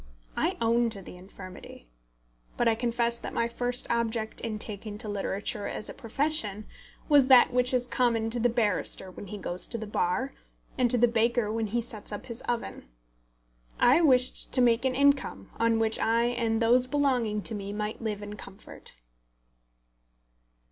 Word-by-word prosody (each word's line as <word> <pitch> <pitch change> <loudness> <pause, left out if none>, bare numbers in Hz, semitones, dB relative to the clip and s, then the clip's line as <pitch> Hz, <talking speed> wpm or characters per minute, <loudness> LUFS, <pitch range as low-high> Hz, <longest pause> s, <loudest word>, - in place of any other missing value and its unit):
I - - -1
own 235 +1 +2
to 200 -4 -2
the - - -11
infirmity. 185 - -12 0.7
But 240 - +2
I 230 - +4
confess 235 0 0
that - - -7
my 230 - +1
first 245 +1 -2
object 230 -1 -1
in 225 -2 -3
taking 210 0 -4
to 215 - -3
literature 205 0 -3
as - - -3
a - - -10
profession 230 -5 -1 0.4
was 285 -4 +5
that 255 -1 +6
which 250 0 +3
is 250 -1 +2
common 230 -3 0
to 240 - 0
the 245 +1 +2
barrister 205 -4 -1
when 195 - -10
he 210 - -7
goes 180 -2 -2
to 235 - -4
the 220 - -6
Bar, 210 +6 -1 0.4
and 250 -2 +2
to 245 - +5
the 240 +1 +5
baker 230 -1 +1
when 225 -1 -1
he 235 +3 -1
sets 220 -4 -7
up 205 - -6
his 235 -1 -7
oven. 240 -1 -4 0.9
I 255 +8 +5
wished 255 -5 +3
to 255 - +5
make 240 0 +3
an 260 -1 0
income 280 - +1
on 230 0 +2
which 225 0 +4
I 230 +1 +2
and 230 -2 -1
those 250 +2 +4
belonging 250 -7 0
to - - -2
me 200 -1 -5
might 210 +2 -4
live 210 -2 -4
in 205 0 -7
comfort. 195 +1 -11
230 Hz, 175 wpm, -28 LUFS, 210-245 Hz, 0.9 s, that